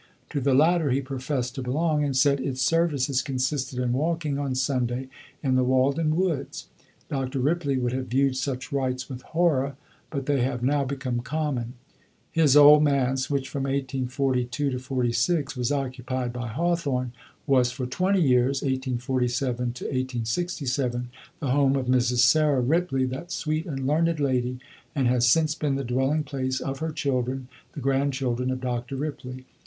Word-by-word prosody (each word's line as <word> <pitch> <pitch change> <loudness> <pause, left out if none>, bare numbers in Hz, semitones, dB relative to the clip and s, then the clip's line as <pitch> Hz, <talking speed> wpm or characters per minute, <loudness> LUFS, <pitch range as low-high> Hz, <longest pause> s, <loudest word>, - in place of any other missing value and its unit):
To 145 - -1
the 135 0 +3
latter 160 +1 +4
he 130 +2 +2
professed 130 -1 -3
to 135 - -5
belong, 150 +4 0
and 140 -3 0
said 140 +1 +4
its 130 -1 -3
services 140 -3 +2
consisted 130 -1 -2
in 125 -1 0
walking 155 0 -1
on 140 -2 -2
Sunday 130 -1 -1 0.3
in 135 -2 +1
the 130 0 +3
Walden 140 +5 +2
woods. 170 -6 -2 0.4
Dr. 135 -1 -3
Ripley 145 0 +1
would 125 -1 -1
have 130 0 -3
viewed 135 +1 +2
such 130 0 -3
rites 130 -2 -1
with 130 -2 -7
horror, 145 -5 +1 0.3
but 140 -3 -4
they 140 -2 +1
have 125 -1 -1
now 140 +2 +2
become 130 -2 -3
common. 130 -3 -2 0.6
His 150 -4 +4
Old 150 +1 +9
Manse, 135 -3 +1
which 140 -2 -1
from 140 - -4
1842 130 -1 -1
to 140 +3 0
1846 130 +4 0
was 125 0 -1
occupied 130 -2 -2
by 125 -1 -4
Hawthorne, 140 -2 -1 0.3
was 130 -3 +3
for 125 0 -4
twenty 185 +8 +1
years 130 0 +2
(1847 130 -1 -1
1867) 125 +1 -2 0.3
the 140 -5 -1
home 140 0 +3
of 135 -2 -1
Mrs. 125 -1 +2
Sarah 150 0 +4
Ripley, 135 -1 +1
that 130 +7 -5
sweet 155 -2 -2
and 135 -4 -4
learned 160 +3 +1
lady, 125 -3 0 0.4
and 135 -4 +2
has 120 0 +3
since 155 +3 +3
been 150 -3 -1
the 135 - -2
dwelling 135 +5 0
place 130 -2 -2
of 135 0 -4
her 160 0 -2
children, 130 -3 -2 0.2
the - - -6
grandchildren 135 -2 0
of 130 0 -2
Dr. 125 +1 -3
Ripley. 130 -3 -5
135 Hz, 160 wpm, -26 LUFS, 125-145 Hz, 0.6 s, Old